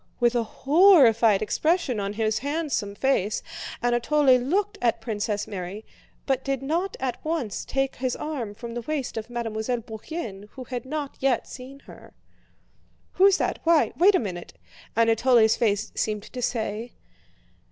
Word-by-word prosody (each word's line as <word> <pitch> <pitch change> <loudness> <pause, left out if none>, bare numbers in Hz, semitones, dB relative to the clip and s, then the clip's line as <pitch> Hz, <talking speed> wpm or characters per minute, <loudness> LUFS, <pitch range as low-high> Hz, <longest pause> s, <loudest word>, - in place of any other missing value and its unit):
With 240 -1 +3
a 240 - +2
horrified 245 - +5
expression 305 - 0
on 200 0 -3
his 215 0 0
handsome 285 -8 -2
face, 215 -5 0 0.4
Anatole 255 +3 +3
looked 385 +11 -1
at 235 -2 +1
Princess 210 -2 -2
Mary, 195 +2 -6 0.4
but 265 -1 0
did 275 -1 -2
not 340 +7 -1
at 250 -2 -3
once 310 - -2
take 270 0 -2
his 255 -1 -1
arm 255 -9 -5
from 230 +1 -8
the 240 - -4
waist 285 +1 -3
of 225 +1 -5
Mademoiselle 235 0 -3
Bourienne 220 - -7
who 260 - -8
had 250 -1 -6
not 290 0 -5
yet 265 -3 +1
seen 270 +2 -10
her. - - -15 1.0
"Who's 390 0 +5
that? - - -1
Why? 330 -1 +4
Wait 385 +4 +5
a - - +4
moment!" 180 -6 -6 0.4
Anatole's 230 0 +4
face 215 -2 0
seemed 210 -2 -2
to 250 - -8
say. 225 -1 -3
245 Hz, 150 wpm, -25 LUFS, 220-280 Hz, 1.0 s, horrified